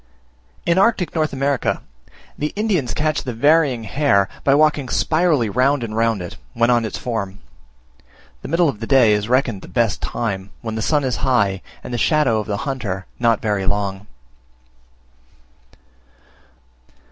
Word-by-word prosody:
In 170 +2 +3
Arctic 195 -4 +2
North 155 -2 0
America 140 -1 -1 0.5
the 150 +1 -3
Indians 185 - 0
catch 155 0 0
the 125 -3 -5
Varying 145 -2 +3
Hare 110 -4 +2 0.2
by 135 - +4
walking 150 -3 +2
spirally 155 -7 +2
round 130 +5 +1
and 110 -2 -5
round 115 -4 +1
it, 90 - -8 0.2
when 115 +1 +3
on 120 -2 +2
its 110 - -4
form: 100 -5 -4 1.0
the - - -7
middle 165 +3 +2
of 135 -8 -2
the 115 - -5
day 125 -6 +5
is 105 +1 -1
reckoned 125 -6 +1
the - - -11
best 110 +3 0
time, 100 -5 -3
when 110 -1 -5
the 110 - -3
sun 145 +5 +1
is 130 -2 -1
high, 100 -8 +1 0.2
and - - -7
the 120 - -1
shadow 135 -3 +2
of 105 - -5
the 105 -2 -2
hunter 110 -9 -3
not 115 -2 +2
very 105 -3 -1
long. 100 -1 -2
120 Hz, 160 wpm, -20 LUFS, 105-145 Hz, 1.0 s, day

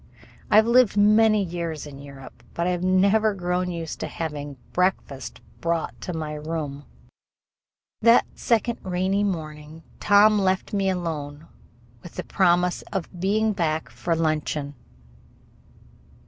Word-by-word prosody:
I - - +3
have 220 +1 +7
lived 235 -3 +4
many 215 0 +5
years 170 -4 -4
in 140 -2 -10
Europe, 135 -3 -12
but 170 - -1
I 180 - +1
have 180 0 -2
never 200 +3 +3
grown 180 0 -1
used 165 -2 -5
to - - -3
having 145 -3 -5 0.2
breakfast 175 -8 -1 0.2
brought 170 -1 -2
to - - -4
my 155 -2 -4
room. 150 -2 -5 1.2
That 230 +2 +6
second 235 0 0
rainy 185 +2 0
morning 155 -4 -5 0.2
Tom 210 +1 +5
left 190 0 0
me 195 -1 +1
alone 155 -4 -4 0.6
with 175 - -12
the - - -4
promise 180 -1 +2
of 185 -2 -5
being 215 +4 +1
back 160 -8 -1
for 125 +8 -2
luncheon. 155 -2 -1
175 Hz, 135 wpm, -24 LUFS, 155-200 Hz, 1.2 s, have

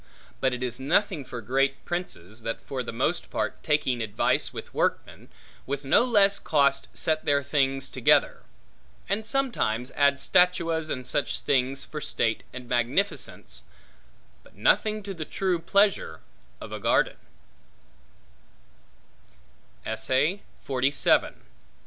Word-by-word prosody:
But 130 - +2
it 125 0 -3
is 125 0 -3
nothing 160 +3 +1
for 125 -2 -7
great 135 +4 0
princes, 115 - -5
that 115 0 -3
for 130 -2 -4
the 120 - -5
most 135 +9 -1
part - - -3
taking 150 -6 +1
advice 105 -2 0
with - - -9
workmen, - - -2 0.4
with 140 +1 -3
no 135 - +5
less 205 -5 +4
cost 140 -2 +2
set 155 -1 0
their 140 -1 +2
things 135 -1 +1
together; 130 -2 +2 0.7
and 220 - -1
sometimes 225 - 0
add 140 -1 +3
statuas 165 +2 +2
and 130 -3 -3
such 145 - -1
things 135 +1 +1
for 150 - -7
state 115 -5 0
and 125 -1 -9
magnificence, 120 - -1 0.8
but - - -21
nothing 210 - +2
to 195 0 -5
the 165 -4 -5
true 185 +2 -1
pleasure 195 - +1 0.4
of - - -9
a - - -5
garden. - - +2
140 Hz, 120 wpm, -26 LUFS, 125-175 Hz, 0.8 s, no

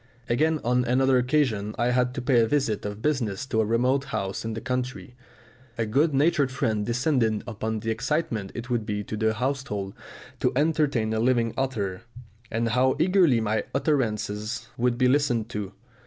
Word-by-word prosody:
Again 155 +6 +2
on 125 +1 +2
another 130 +1 +3
occasion 125 -6 0
I 120 +2 +1
had 125 0 +1
to 125 - -4
pay 125 -2 +4
a 115 - +3
visit 125 -7 0
of 105 +2 -5
business 130 -8 0
to 110 -4 +1
a - - +1
remote 125 +4 +2
house 95 -5 -3
in 110 -1 -4
the - - -3
country. 125 +1 -4 0.6
A 115 - 0
good 140 +9 +2
natured 145 -1 +2
friend 110 -5 0
descanted 120 -3 +1
upon 110 -1 -3
the 115 - -1
excitement 120 -4 -2
it 120 +1 -5
would 120 -3 0
be 105 -1 -3
to 110 - -5
the 110 0 +1
household 120 -6 -2 0.5
to - - +2
entertain 145 -7 +1
a 110 - 0
living 120 -1 +2
author, 110 -9 -2 0.5
and 115 +1 0
how 130 +3 +3
eagerly 175 -9 +4
my 110 0 0
utterances 110 -5 -1
would 120 0 +1
be 125 0 +3
listened 125 -5 +1
to. 100 -2 -4
120 Hz, 175 wpm, -26 LUFS, 110-135 Hz, 0.6 s, pay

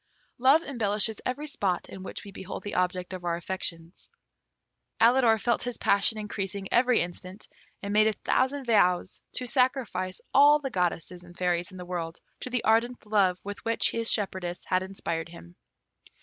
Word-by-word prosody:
Love 275 +6 +5
embellishes 215 -4 0
every 265 +4 -3
spot 195 -11 -1
in 190 - -9
which 190 - -7
we 200 - -10
behold 190 0 -7
the 205 - -5
object 180 0 -1
of 185 -1 -6
our 170 -1 0
affections. 170 -1 -5 0.9
Alidor 230 -1 +5
felt 235 +2 +1
his 245 -1 -3
passion 200 +2 +2
increasing 200 -2 -4
every 250 0 +4
instant, 180 +3 -7 0.4
and 200 0 -3
made 215 +1 +5
a 220 - +2
thousand 265 +5 0
vows 185 -6 +2
to 255 - -3
sacrifice 250 -8 0
all 290 +2 +7
the 275 -3 -5
goddesses 180 -2 -2
and 175 0 -15
fairies 175 0 0
in 185 - -11
the 180 - -7
world 170 -2 -5 0.2
to - - -5
the 250 -1 -1
ardent 230 +2 +1
love 195 -4 +2
with 205 0 -7
which 230 0 +2
his 230 0 +1
shepherdess 185 -4 -2
had 185 0 +1
inspired 170 -3 -4
him. 90 - -13
200 Hz, 170 wpm, -27 LUFS, 180-235 Hz, 0.9 s, all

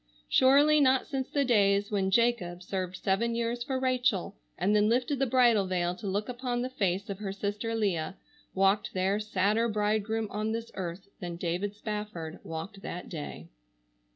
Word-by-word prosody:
Surely 290 +4 +5
not 265 -2 +4
since 270 -3 -3
the 280 -1 +1
days 200 -3 +3
when 195 -2 +1
Jacob 190 -5 +1
served 185 -1 -3
seven 200 +5 0
years 235 +1 -1
for 260 0 -2
Rachel 255 -7 +1 0.2
and 205 +2 +2
then 210 0 +4
lifted 250 +4 +1
the 270 - +2
bridal 235 -5 +4
veil 175 -1 0
to 215 - -6
look 200 +2 -1
upon 245 -1 -2
the 255 - -4
face 195 -3 -1
of 200 -2 -5
her 200 -2 -3
sister 205 +3 -3
Leah, 190 -5 -1 0.4
walked 195 +2 +2
there 190 +2 +1
sadder 210 +2 +1
bridegroom 215 +1 0
on 215 +1 -1
this 230 0 -4
earth 185 +1 -5
than 175 -4 -5
David 180 +4 -2
Spafford 210 -6 -5
walked 195 +5 -6
that 180 -2 -6
day. 145 - -7
210 Hz, 170 wpm, -29 LUFS, 190-235 Hz, 0.4 s, Surely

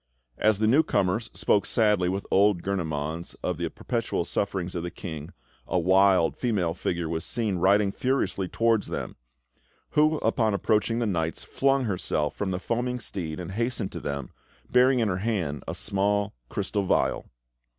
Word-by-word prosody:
As 110 -1 +3
the 110 - +1
newcomers 110 - +2
spoke 100 - +2
sadly 105 -5 +2
with 95 +2 -3
old 100 -2 +4
Gurnemanz 80 -3 -3
of - - -2
the - - -1
perpetual - - -2
sufferings 95 -3 -2
of 85 - -3
the 90 - -4
King, 80 -4 -7 0.4
a - - 0
wild 95 0 +4
female 100 -9 0
figure 85 -1 -2
was 80 0 -2
seen 110 -6 -1
riding 100 +2 +4
furiously 100 -7 0
towards 115 +2 +1
them; - - -4 0.8
who, 155 +1 +3
upon 110 -4 +2
approaching 110 +3 +1
the 120 - 0
knights, 85 -5 -1
flung 135 0 +1
herself 90 -8 -1
from 100 - -2
the 90 - -1
foaming 125 +4 -2
steed 85 -7 -5
and 90 0 -6
hastened 115 -1 -2
to - - -6
them, 70 -1 -4 0.4
bearing 125 +1 +5
in 115 -2 +2
her 90 -3 0
hand 95 -9 -2
a - - -3
small 100 0 0 0.2
crystal 100 - -1
vial. 95 - 0
100 Hz, 160 wpm, -26 LUFS, 90-115 Hz, 0.8 s, bearing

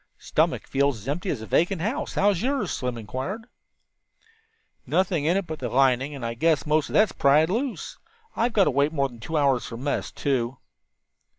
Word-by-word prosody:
"Stomach - - 0
feels 140 -2 +1
as 105 +3 -12
empty 175 +7 -2
as 115 -9 -2
a - - -6
vacant 175 - +1
house; 240 - -3
how's 200 -3 +2
yours?" 260 - 0
Slim 125 -2 -3
inquired. 130 - -5 1.4
"Nothing 175 -5 +1
in 170 +4 +3
it 195 - -1
but 160 -2 -6
the 125 - -3
lining, 135 +3 +2
and 130 -4 -6
I 115 - -2
guess 160 +5 +1
most 150 0 +1
of - - -8
that's 215 -1 +4
pried 150 +5 +3
loose. 245 +4 -3 0.4
We've 235 +2 +1
got 210 -3 +4
to 150 - +2
wait 140 +3 +2
more 140 -3 0
than 120 -2 -14
two 160 +8 -3
hours 135 -4 +2
for 115 - -7
mess, 140 +4 -2
too." 130 -3 -1
145 Hz, 195 wpm, -25 LUFS, 130-185 Hz, 1.4 s, that's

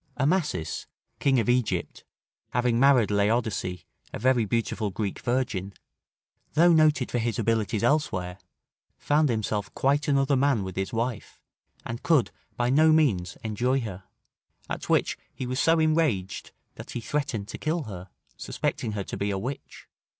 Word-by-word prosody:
Amasis, 145 - 0 0.3
King 135 -2 +3
of 115 - 0
Egypt, 125 -2 0 0.5
having 120 -1 +2
married 130 -5 +5
Laodice, 105 -3 0 0.3
a - - -5
very 125 -1 +2
beautiful 110 0 -1
Greek 100 +1 -3
virgin, 120 -7 -2 0.8
though 170 +3 +5
noted 155 -5 +3
for 120 - 0
his 115 -1 -1
abilities 110 -1 0
elsewhere, 95 -10 0 0.6
found 150 0 +2
himself 105 -2 -2
quite 140 +2 +1
another 140 -1 +3
man 135 -5 +2
with 95 -1 -6
his 95 0 -2
wife, 115 0 -3 0.5
and 115 +1 -5
could 155 -8 +3 0.3
by 120 +1 +1
no 155 +3 +5
means 105 - +2
enjoy 120 +5 0
her; 95 -5 -7 0.6
at - - -5
which - - +1 0.2
he 130 - -4
was 130 +2 -2
so 165 0 +4
enraged, 155 - +1 0.2
that - - -11
he - - -4
threatened 120 -5 -2
to - - -7
kill 160 +1 -1
her, 95 -5 -8 0.3
suspecting 110 -3 -3
her 100 -1 -3
to - - -6
be 100 - -1
a 100 - -1
witch. 130 +8 -7
120 Hz, 150 wpm, -26 LUFS, 105-140 Hz, 0.8 s, married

